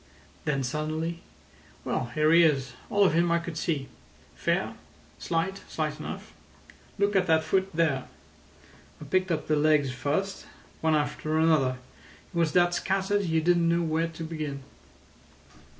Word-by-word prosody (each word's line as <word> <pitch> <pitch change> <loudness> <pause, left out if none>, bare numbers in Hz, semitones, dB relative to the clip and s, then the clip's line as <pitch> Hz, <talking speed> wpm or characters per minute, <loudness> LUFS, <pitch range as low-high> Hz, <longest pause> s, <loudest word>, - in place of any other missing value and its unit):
Then 140 -2 0
suddenly: 155 +5 -3 0.6
"Well, - - -1
here 155 0 +3
he 170 +1 +7
is—all 150 +6 +1
of 180 - +3
him 170 +1 +3
I 170 - +4
could 170 -1 -5
see. 155 -4 -1 0.5
Fair. - - -1 0.5
Slight—slight 165 -3 -2
enough. - - -7 0.6
Look 200 0 +1
at 185 -1 +3
that 160 -1 +4
foot 190 +2 +1
there. 155 -6 +1 0.9
I - - -9
picked 185 +5 +1
up 155 -2 -1
the 155 - +2
legs 150 -2 +3
first, 155 +10 -2 0.3
one 160 -1 +3
after 155 +1 -1
another. 155 -6 +3 0.6
He 170 - -1
was 160 -3 +2
that 175 -1 +4
scattered 195 +2 0
you 160 -1 +1
didn't 170 0 +3
know 170 0 +2
where 160 +1 0
to 165 0 -8
begin." 155 -4 -5
160 Hz, 145 wpm, -27 LUFS, 150-175 Hz, 0.9 s, he